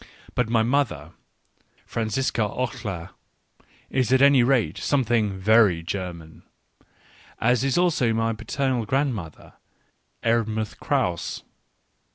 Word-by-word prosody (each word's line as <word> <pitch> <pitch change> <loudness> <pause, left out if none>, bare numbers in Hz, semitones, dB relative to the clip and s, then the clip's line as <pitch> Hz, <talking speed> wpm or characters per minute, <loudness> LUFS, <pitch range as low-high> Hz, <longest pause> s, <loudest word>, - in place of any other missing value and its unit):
But 125 -3 0
my 115 -1 +3
mother, 115 - -1 0.7
Franziska 115 +2 -1
Oehler, 105 -5 -3 0.8
is 130 -3 0
at 130 - +5
any 140 -1 +6
rate 120 - +1
something 115 -7 +1
very 100 -4 +4
German; 85 -3 -6 1.0
as 125 +1 +2
is 135 +2 +1
also 165 -10 +2
my 115 0 0
paternal 125 +1 -2
grandmother, 120 - -2 0.7
Erdmuthe 110 -2 0
Krause. 85 -2 -1
115 Hz, 100 wpm, -24 LUFS, 100-130 Hz, 1.0 s, any